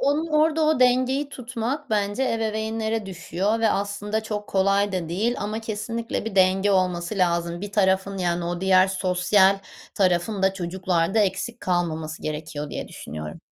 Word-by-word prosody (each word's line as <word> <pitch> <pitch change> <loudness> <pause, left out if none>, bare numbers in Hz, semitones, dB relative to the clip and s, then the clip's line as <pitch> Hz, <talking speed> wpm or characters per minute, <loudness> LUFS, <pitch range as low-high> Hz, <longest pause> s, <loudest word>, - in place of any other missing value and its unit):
Onun 290 +4 +1
orada 310 0 +2
o 310 -3 +2
dengeyi 255 +3 +3
tutmak 255 +1 -4
bence 205 +3 0
ebeveynlere 220 -1 -2
düşüyor 195 +4 -2
ve 225 - +4
aslında 205 +2 -2
çok 210 -1 -4
kolay 195 +1 +2
da 180 -3 -2
değil 215 +8 0
ama 215 +2 -3
kesinlikle 225 +1 -4
bir 225 -3 -5
denge 190 +1 +4
olması 185 +1 0
lazım. 170 -1 0
Bir 205 0 -6
tarafın, 190 -1 +2
yani 175 -1 0
o 175 0 -3
diğer 190 0 +5
sosyal 190 +1 +3 0.4
tarafın 190 +1 +1
da 190 0 +4
çocuklarda 180 +1 0
eksik 210 +4 0
kalmaması 160 -4 -2
gerekiyor 150 -1 -5
diye - - -5
düşünüyorum. 75 0 -8
200 Hz, 150 wpm, -24 LUFS, 180-225 Hz, 0.4 s, diğer